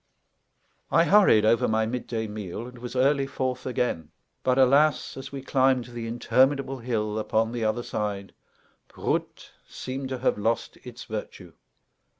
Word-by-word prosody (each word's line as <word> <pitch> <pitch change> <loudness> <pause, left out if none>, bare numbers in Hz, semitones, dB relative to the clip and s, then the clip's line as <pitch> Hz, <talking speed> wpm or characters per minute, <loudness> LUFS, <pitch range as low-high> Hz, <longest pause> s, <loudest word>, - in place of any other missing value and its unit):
I 165 - +4
hurried 170 - +5
over 115 +1 +3
my 110 0 +1
midday 115 -1 -3
meal, 105 0 -6
and 125 0 -11
was 125 +1 -7
early 135 +1 +2
forth 130 -2 -3
again. 120 -11 -1 0.3
But, 130 0 +1
alas, 140 +4 +3
as 135 - -8
we 135 -1 -6
climbed 130 -2 +2
the 120 -2 -6
interminable 130 +3 +1
hill 110 -3 -2
upon 110 +1 0
the 120 -1 -3
other 110 +2 0
side, 100 -3 -4 0.5
"Proot!" - - -3 0.2
seemed 130 +1 -5
to 130 - -3
have 125 -4 0
lost 115 +2 -1
its 125 -1 -9
virtue. 100 -5 -7
120 Hz, 150 wpm, -26 LUFS, 110-130 Hz, 0.5 s, hurried